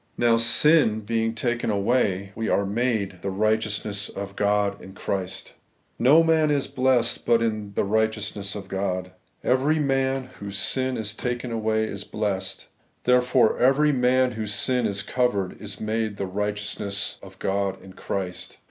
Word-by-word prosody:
Now, 120 Hz, -1 st, +4 dB
sin 115 Hz, 0 st, +4 dB
being 115 Hz, +1 st, -1 dB
taken 120 Hz, 0 st, -1 dB
away, 100 Hz, -2 st, +1 dB
we 115 Hz, +1 st, -3 dB
are 100 Hz, -, +2 dB
made 105 Hz, -4 st, -1 dB
the 100 Hz, -, -3 dB
righteousness 105 Hz, 0 st, -1 dB
of 100 Hz, 0 st, -7 dB
God 100 Hz, -1 st, +1 dB
in 95 Hz, -, -11 dB
Christ. 95 Hz, -1 st, -4 dB, 0.5 s
No 145 Hz, +7 st, +6 dB
roan 160 Hz, -1 st, +3 dB
is 145 Hz, -2 st, +1 dB
blessed 125 Hz, -2 st, +2 dB
but 115 Hz, -1 st, +3 dB
in 110 Hz, -3 st, -2 dB
the -, -, +1 dB
righteousness 105 Hz, -1 st, -1 dB
of 100 Hz, -2 st, -7 dB
God: 95 Hz, -1 st, -3 dB, 0.3 s
every 135 Hz, +5 st, +2 dB
man 135 Hz, -2 st, 0 dB
whose 100 Hz, -1 st, -5 dB
sin 130 Hz, +6 st, +1 dB
is 105 Hz, -2 st, -3 dB
taken 120 Hz, +1 st, -3 dB
away 110 Hz, -1 st, 0 dB
is 100 Hz, -2 st, -3 dB
blessed; 100 Hz, -3 st, -3 dB, 0.4 s
therefore 125 Hz, -1 st, +3 dB
every 140 Hz, +4 st, +4 dB
man 130 Hz, -1 st, +2 dB
whose 110 Hz, -2 st, -1 dB
sin 125 Hz, 0 st, +1 dB
is 100 Hz, 0 st, -2 dB
covered 110 Hz, -9 st, -1 dB
is 105 Hz, -1 st, -5 dB
made 110 Hz, -1 st, -2 dB
the 100 Hz, -, -2 dB
righteousness 105 Hz, 0 st, -3 dB
of -, -, -13 dB
God 100 Hz, 0 st, -1 dB
in 95 Hz, 0 st, -13 dB
Christ. 95 Hz, -2 st, -5 dB
110 Hz, 155 wpm, -24 LUFS, 100-125 Hz, 0.5 s, No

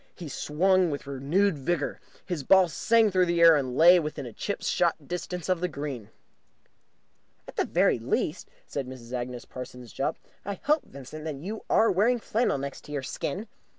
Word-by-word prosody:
He 170 Hz, -5 st, -8 dB
swung 180 Hz, +6 st, +2 dB
with 145 Hz, -2 st, -4 dB
renewed 145 Hz, +6 st, +1 dB
vigour. 145 Hz, +2 st, -1 dB, 0.3 s
His 175 Hz, -5 st, -3 dB
ball 190 Hz, +6 st, +5 dB
sang 225 Hz, +5 st, +3 dB
through 185 Hz, -1 st, +3 dB
the 170 Hz, 0 st, +1 dB
air, 165 Hz, -1 st, +8 dB
and 130 Hz, -3 st, -1 dB
lay 175 Hz, +3 st, +8 dB
within 150 Hz, -6 st, -5 dB
chip -, -, -4 dB
shot -, -, 0 dB
distance 180 Hz, -1 st, -4 dB
of 185 Hz, -2 st, +1 dB
the 180 Hz, -, +1 dB
green. 140 Hz, -, -6 dB, 1.4 s
"At -, -, -11 dB
the -, -, +1 dB
very -, -, +3 dB
least," -, -, -2 dB, 0.2 s
said 140 Hz, -3 st, -4 dB
Mrs. 125 Hz, -2 st, -10 dB
Agnes 125 Hz, -1 st, -4 dB
Parsons 125 Hz, -2 st, -9 dB
Jopp, 135 Hz, -, -1 dB, 0.3 s
"I 200 Hz, 0 st, -4 dB
hope, 300 Hz, +1 st, +2 dB
Vincent, 140 Hz, +3 st, -10 dB
that 155 Hz, -2 st, -3 dB
you 195 Hz, +10 st, -6 dB
are 225 Hz, -, +4 dB
wearing 220 Hz, +7 st, +3 dB
flannel 225 Hz, -6 st, 0 dB
next 140 Hz, +1 st, -7 dB
your 145 Hz, -2 st, -3 dB
skin." 185 Hz, +10 st, -4 dB
155 Hz, 175 wpm, -27 LUFS, 135-185 Hz, 1.4 s, air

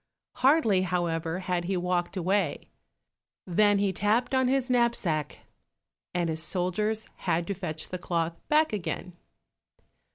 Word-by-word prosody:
Hardly, 255 Hz, -, +4 dB
however, 175 Hz, -1 st, -1 dB
had 180 Hz, -2 st, -1 dB
he 190 Hz, +1 st, 0 dB
walked 180 Hz, +1 st, -1 dB
away 185 Hz, -2 st, 0 dB, 0.8 s
than 205 Hz, +3 st, +3 dB
he 200 Hz, -1 st, +1 dB
tapped 220 Hz, +7 st, +1 dB
on 260 Hz, -1 st, +3 dB
his 265 Hz, -1 st, +1 dB
knapsack, 235 Hz, -, 0 dB, 0.7 s
and 175 Hz, -1 st, 0 dB
his 160 Hz, 0 st, -2 dB
soldiers 185 Hz, +6 st, -1 dB
had 170 Hz, +1 st, 0 dB
to 200 Hz, -, -2 dB
fetch 160 Hz, -5 st, -5 dB
the 180 Hz, -, -4 dB
cloth 170 Hz, -1 st, -1 dB
back 305 Hz, -3 st, +3 dB
again. 180 Hz, -2 st, -4 dB
185 Hz, 130 wpm, -28 LUFS, 170-215 Hz, 0.8 s, Hardly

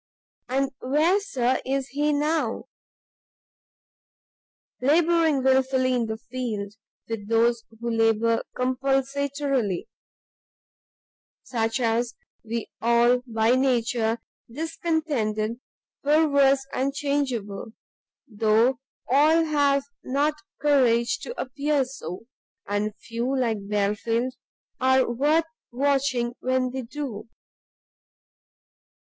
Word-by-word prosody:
"And 270 Hz, +1 st, 0 dB
where, 310 Hz, +9 st, +2 dB
Sir, 260 Hz, -10 st, 0 dB
is 270 Hz, 0 st, -2 dB
he 295 Hz, +3 st, 0 dB
now? 295 Hz, -4 st, 0 dB, 2.2 s
"Labouring 320 Hz, 0 st, +3 dB
wilfully 260 Hz, -1 st, +3 dB
in 240 Hz, -2 st, 0 dB
the 220 Hz, 0 st, -3 dB
field, 220 Hz, -4 st, -5 dB, 0.3 s
with 225 Hz, -3 st, -5 dB
those 230 Hz, 0 st, +2 dB, 0.2 s
who 235 Hz, 0 st, -2 dB
labour 225 Hz, 0 st, +2 dB, 0.2 s
compulsatorily; 270 Hz, -3 st, 0 dB, 1.6 s
such 225 Hz, 0 st, -1 dB
are 230 Hz, -1 st, +2 dB, 0.4 s
we 230 Hz, 0 st, -4 dB
all 235 Hz, +2 st, +4 dB
by 225 Hz, 0 st, +2 dB
nature, 235 Hz, -3 st, +1 dB, 0.3 s
discontented, 285 Hz, -8 st, -1 dB, 0.4 s
perverse, 280 Hz, -2 st, +4 dB
and 275 Hz, +2 st, -1 dB
changeable; 245 Hz, -9 st, -2 dB, 0.5 s
though 225 Hz, +3 st, +2 dB, 0.3 s
all 305 Hz, +6 st, +4 dB
have 285 Hz, -3 st, +2 dB, 0.2 s
not 285 Hz, +4 st, +1 dB, 0.3 s
courage 250 Hz, -5 st, +3 dB
to 485 Hz, -, -7 dB
appear 280 Hz, +1 st, 0 dB
so, 205 Hz, -7 st, -8 dB, 0.4 s
and 205 Hz, +1 st, -2 dB
few, 235 Hz, +5 st, -3 dB
like 220 Hz, -5 st, -1 dB
Belfield, 210 Hz, +4 st, 0 dB, 0.5 s
are 260 Hz, 0 st, +4 dB
worth 295 Hz, +7 st, +2 dB, 0.3 s
watching 260 Hz, -2 st, +1 dB
when 255 Hz, 0 st, 0 dB
they 260 Hz, +1 st, -4 dB
do. 250 Hz, -3 st, -6 dB
255 Hz, 90 wpm, -25 LUFS, 230-280 Hz, 2.2 s, all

